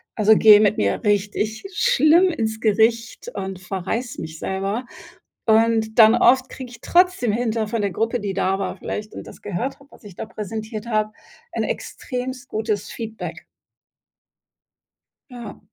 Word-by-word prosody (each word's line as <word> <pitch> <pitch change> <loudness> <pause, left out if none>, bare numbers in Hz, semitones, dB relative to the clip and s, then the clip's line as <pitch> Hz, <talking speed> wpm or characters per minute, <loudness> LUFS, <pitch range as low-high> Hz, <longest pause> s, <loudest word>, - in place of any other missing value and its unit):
also, 215 0 +5
gehe 210 -1 +8
mit 210 -1 +3
mir 100 -1 0
richtig 210 +1 0
schlimm 360 -6 +4
ins 220 -8 -2
Gericht 230 - +1
und 190 -1 -5
verreiß 195 +6 -4
mich 160 0 -7
selber. 195 +7 -3 0.6
Und, 225 0 +2
dann 220 +1 +8
oft 260 +1 +4
kriege 260 -2 -8
ich 240 - -12
trotzdem 350 - +3
hinter 225 -2 -1
von 225 0 -2
der 200 -1 -1
Gruppe, 225 +6 -1
die 200 -2 -3
da 190 0 0
war 190 -2 -4
vielleicht 210 0 -6
und - - -9
das - - -13
gehört 205 +10 -4
habe, 280 - -18
was - - -18
ich 200 -4 -11
da - - -5
präsentiert 220 +1 -6
habe, 215 -1 0 0.4
ein - - -2
extrem 250 -1 -5
gutes 215 -2 -2
Feedback. 225 -1 -7 1.9
Ja. 240 -4 -9
220 Hz, 155 wpm, -22 LUFS, 205-240 Hz, 1.9 s, gehe